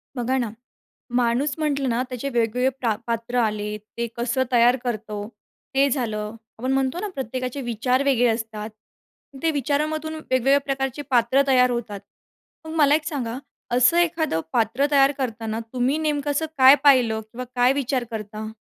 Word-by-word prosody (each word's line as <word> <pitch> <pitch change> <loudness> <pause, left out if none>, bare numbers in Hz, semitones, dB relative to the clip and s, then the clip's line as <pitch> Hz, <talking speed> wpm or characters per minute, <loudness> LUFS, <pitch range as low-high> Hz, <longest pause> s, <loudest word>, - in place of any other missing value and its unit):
बघा 250 +2 0
ना, 240 -4 -1 0.7
माणूस 245 +4 +1
म्हटलं 280 -4 0
ना, 235 +1 0
त्याचे 255 +2 -4
वेगवेगळे 240 +1 +1
प्रा 230 -4 +1
पात्र 230 +1 -2
आले, 210 -2 -1
ते 225 +3 -6
कसं 240 +2 0
तयार 240 0 +5
करतो 215 -3 -4 0.5
ते 275 +1 +4
झालं. 220 -5 -2 0.2
आपण 255 +3 -1
म्हणतो 270 +4 0
ना 420 - -3
प्रत्येकाचे 255 +1 -4
विचार 250 +2 0
वेगळे 255 -3 +3
असतात, 220 -2 -3 0.7
ते 325 - +3
विचारामधून 305 +2 -1
वेगवेगळ्या 270 -2 +2
प्रकारचे 270 0 -2
पात्रं 245 +2 +4
तयार 250 -2 +5
होतात. 225 -4 -4 0.7
मग 315 - -7
मला 295 -2 +5
एक 310 0 -2
सांगा 255 -6 -3 0.4
असं 250 +7 +5
एखादं 325 - +1
पात्र 240 +4 +2
तयार 275 -1 +5
करताना, 225 -4 -3
तुम्ही 255 +4 +1
नेमकं 295 -2 -1
असं 290 +3 0
काय 265 +1 +9
पाहिलं? 245 -6 +4
किंवा 250 +2 -6
काय 250 +1 +4
विचार 270 -2 -1
करता? 215 0 -6
250 Hz, 155 wpm, -23 LUFS, 230-280 Hz, 0.7 s, काय